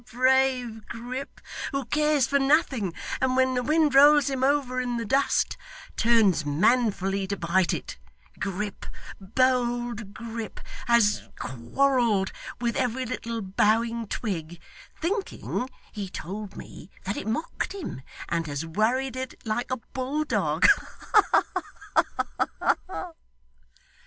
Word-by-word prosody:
brave 255 -2 +2
Grip, 250 +4 -6 0.3
who 275 -1 -2
cares 300 0 +2
for 280 +1 +2
nothing, 270 - +2 0.3
and 260 -1 +2
when 260 0 +3
the 250 - +1
wind 305 +2 +3
rolls 290 +1 +7
him 260 -1 -1
over 265 -2 +2
in 245 -1 -2
the 230 - -3
dust, 270 +6 +1 0.4
turns 220 -8 +4
manfully 195 - +2
to 200 +1 -2
bite 170 +1 +2
it - - -5 0.4
Grip, 200 +1 -4 0.3
bold 240 0 0
Grip, 230 -1 -6 0.3
has 235 -3 +3
quarrelled 215 - +1 0.3
with 235 -1 -1
every 255 0 0
little 230 -2 -4
bowing 225 +4 +1
twig 175 -7 -4 0.4
thinking, 350 - -2 0.2
he 200 -3 -5
told 200 +4 -6
me, - - -10
that 200 +2 -2
it - - -5
mocked 230 - -2
him 340 - -6 0.3
and 165 -1 -1
has 145 +2 -3
worried 235 +9 0
it 260 0 -5
like 225 +2 -1
a 255 - -1 0.2
bulldog. 285 +4 0
Ha - - +3
ha - - -1
ha! 370 -2 -5
235 Hz, 120 wpm, -26 LUFS, 205-265 Hz, 0.4 s, rolls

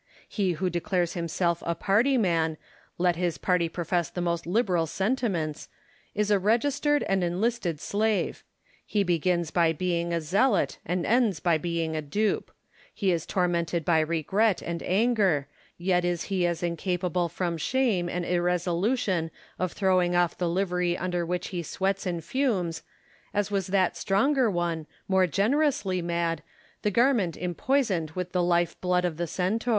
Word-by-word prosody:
He 195 -4 0
who 180 +3 -1
declares 175 0 0
himself 170 0 -1
a 170 - -1
party 235 +10 +2
man, 165 -7 +1 0.4
let 175 -1 +2
his 175 -2 -1
party 180 -3 +1
profess 175 0 -1
the - - -6
most 170 -1 -1
liberal 180 -4 +1
sentiments, 190 - -1 0.5
is 210 0 +1
a 205 - +4
registered 280 +8 +2
and 195 -1 0
enlisted 180 -1 -1
slave; 215 +4 -1 0.4
he 205 -2 0
begins 175 -1 0
by 165 -2 +3
being 170 0 -1
a 170 - +1
zealot 185 - +1
and 180 +1 -1
ends 225 -7 +2
by 165 -1 +2
being 165 -1 -2
a 155 - -1
dupe; 205 +9 -1 0.4
he 195 -4 0
is 165 -3 -1
tormented 170 -3 0
by 165 -2 +4
regret 170 +6 +1
and 170 0 -4
anger, 195 - +2 0.3
yet 180 0 +1
is 175 -1 -1
he 185 -3 0
as 170 0 -2
incapable 175 0 -1
from 175 0 -2
shame 205 -2 0
and 175 0 -2
irresolution 180 +2 0 0.3
of 185 -2 -1
throwing 185 -3 +2
off 175 -1 +2
the 175 -2 -1
livery 180 -1 0
under 175 -2 -2
which 180 +1 -2
he 180 -3 -3
sweats 195 +3 -2
and 170 -2 -3
fumes, 195 - -1 0.5
as 205 0 0
was 195 -3 0
that 185 -1 +2
stronger 245 +5 +2
one, 170 -4 -2 0.2
more 190 -1 +3
generously 210 - +1
mad, 170 -1 -1 0.4
the 210 - +1
garment 230 - +2
empoisoned 180 - 0
with 180 -1 -3
the 180 - +1
life 175 -1 +1
blood 180 0 +1
of 165 -3 -2
the 175 0 -2
Centaur. 195 +9 -1
180 Hz, 155 wpm, -27 LUFS, 170-200 Hz, 0.5 s, a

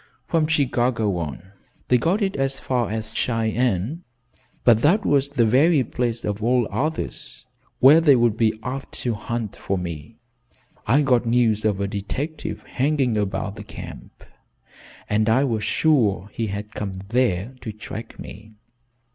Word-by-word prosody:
"From 160 -2 +1
Chicago 125 - +1
on. 85 +3 -6 0.4
They 125 - +5
got 190 - +1
it 195 -1 -1
as 135 0 -1
far 125 -3 -1
as 110 0 -3
Cheyenne, 115 - 0 0.6
but 115 -2 +5
that 185 - +3
was 140 -1 +2
the 130 -5 +2
very 140 +6 +4
place 120 0 -2
of 105 0 -3
all 120 0 +2
others 155 +3 -4 0.3
where 145 +5 +7
they 145 -4 +6
would 120 -3 +3
be 110 -1 +1
apt 135 +2 -5
to 120 - 0
hunt 110 0 -4
for 100 - -2
me. 85 -5 -6 0.7
I 135 +7 +4
got 125 -3 +2
news 115 -3 +2
of 105 -2 +1
a 100 - 0
detective 110 +2 -4
hanging 135 -3 0
about 100 0 -2
the 105 - -7
camp, - - -10 0.8
and 110 +1 +1
I 125 +5 +4
was 115 -6 -1
sure 105 -8 +2
he 115 - -2
had 105 +2 -5
come 95 -2 -5
there 120 -2 +1
to 110 - -5
track 110 +1 -8
me. 110 +2 -11
115 Hz, 155 wpm, -23 LUFS, 105-135 Hz, 0.8 s, where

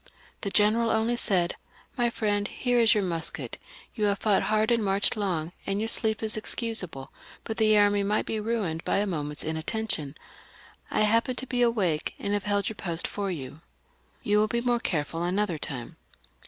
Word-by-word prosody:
The 200 - -2
general 215 +3 +4
only 225 +2 +2
said, 180 -7 +1 0.2
" - - -29
My 240 0 +3
friend, 205 -3 0
here 245 -1 0
is 225 -2 +6
your 210 - +2
musket; 165 -7 -4 0.3
you 215 -3 0
have 200 -1 +2
fought 205 -2 +2
hard 215 +1 +1
and 230 -2 +2
marched 200 +3 +2
long, 175 -6 -2
and 195 +1 -1
your 220 +1 -1
sleep 220 -1 +2
is 215 -1 +2
excusable, 215 - -3 0.3
but 220 - -5
the 215 -1 +4
army 205 0 +4
might 205 +2 0
be 220 - -2
ruined 210 -7 -2
by - - 0
a 205 - +2
moment's 150 -6 -3
inattention. 160 -2 -2 0.7
I - - +1
happened 230 +4 +2
to 260 - -4
be 250 -1 -1
awake, 200 -10 +1
and 200 - -2
have 205 -1 -1
held 205 -1 +1
your 220 - -4
post 170 -2 -1
for 200 -1 -3
you. 145 -3 -6 0.6
You 210 0 +3
will 215 - +3
be 235 +2 -1
more 240 0 +2
careful 165 -4 -2
another 180 -1 0
time." 125 -5 -6
205 Hz, 190 wpm, -27 LUFS, 175-220 Hz, 0.7 s, is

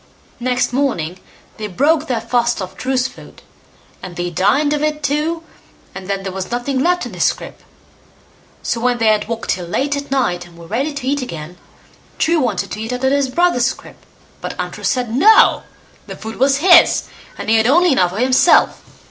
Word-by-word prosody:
Next 250 0 0
morning 185 - -1 0.4
they 215 -1 -4
broke 300 - +1
their 240 -3 -1
fast 235 +1 0
off 185 -1 -6
True's 260 0 -1
food, - - -15 0.6
and 180 -1 -9
they 175 0 -3
dined 210 - +2
off 295 - -1
it 305 0 -1
too, 310 +3 -1 0.5
and 190 -1 -9
then 195 -1 -2
there 190 - -4
was 190 0 -5
nothing 245 +3 -2
left 355 +5 +1
in - - -8
his - - -1
scrip. - - -3 1.0
So 230 - -2
when 245 0 +1
they 230 - 0
had 210 -1 +1
walked 230 0 -3
till 180 -2 -3
late 275 +11 -1
at 285 0 -6
night, 180 -10 -1
and 170 -1 -18
were 170 - -12
ready 255 - -2
to 285 -3 -6
eats 285 +1 0
again, 170 -7 -7 0.6
True 330 0 +2
wanted 250 -5 -1
to 215 - -5
eat 225 +2 -4
out 250 +1 -5
of 265 - +3
his 280 -1 +1
brother's 340 -4 +2
scrip, 265 - -6 0.4
but - - -5
Untrue - - -5
said 245 -3 -1
"No", 430 +11 +5 0.5
the - - -7
food 220 0 -8
was 270 +2 +3
his, 355 -2 +6 0.3
and - - -7
he 225 +1 +4
had 220 +1 +3
only 345 +6 +4
enough 185 -10 +3
for 185 - -7
himself. 255 +7 +3
250 Hz, 200 wpm, -18 LUFS, 210-285 Hz, 1.0 s, his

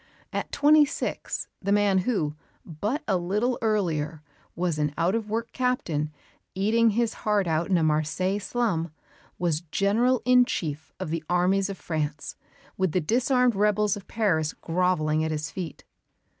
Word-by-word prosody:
At - - -3
twenty 300 +1 +6
six, 290 - -3
the 200 - -1
man 205 -2 +4
who, 185 -8 0 0.3
but 210 - -3
a 195 - +2
little 210 +8 0
earlier, 165 -8 -1 0.3
was 170 -3 -1
an 150 -1 -1
out 170 +3 +2
of 220 -2 -2
work 225 +2 -2
captain, 170 - -1 0.4
eating 225 +4 +3
his 230 +1 0
heart 210 -2 +2
out 165 +2 0
in 185 - +4
a 165 - +1
Marseilles 160 +6 0
slum, 195 -11 -1 0.5
was 165 -3 0
General 210 +9 +1
in 250 0 +6
Chief 160 -6 -4
of 155 - -4
the 165 -1 -2
armies 185 +3 +2
of 195 - -5
France, 150 -2 -3 0.4
with 185 -4 0
the 185 - +3
disarmed 250 - +2
rebels 210 0 +2
of 205 - -10
Paris 160 -9 0
grovelling 165 -3 +1
at 160 - -1
his 155 +1 -3
feet. 175 -6 -6
190 Hz, 155 wpm, -26 LUFS, 160-220 Hz, 0.5 s, twenty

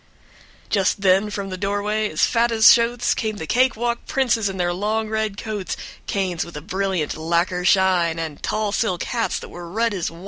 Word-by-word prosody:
# - - -25 0.3
Just 195 0 +1
then 195 +2 +3
from 200 -1 -5
the 185 - -5
doorway, 205 +2 -1
as 155 - +2
fat 235 0 +1
as 220 -1 +2
shotes, 240 +1 +1
Came 215 -2 -2
the 160 - -5
cake 255 +9 +2
walk 235 +1 -2
princes 230 -6 +1
in 190 - -6
their 175 -1 0
long 215 +4 -1
red 220 -2 -2
coats, 210 -3 -4 0.3
Canes 185 -4 -1
with 170 -3 -9
a - - -6
brilliant 190 -2 -2
lacquer 170 +3 0
shine, 180 -3 +3
And 160 -3 -5
tall 215 -1 -1
silk 190 -4 0
hats 235 -2 -1
that - - -8
were 175 -1 -9
red 225 +4 0
as 180 -4 -2
wine. 165 - -13
200 Hz, 205 wpm, -22 LUFS, 180-220 Hz, 0.3 s, then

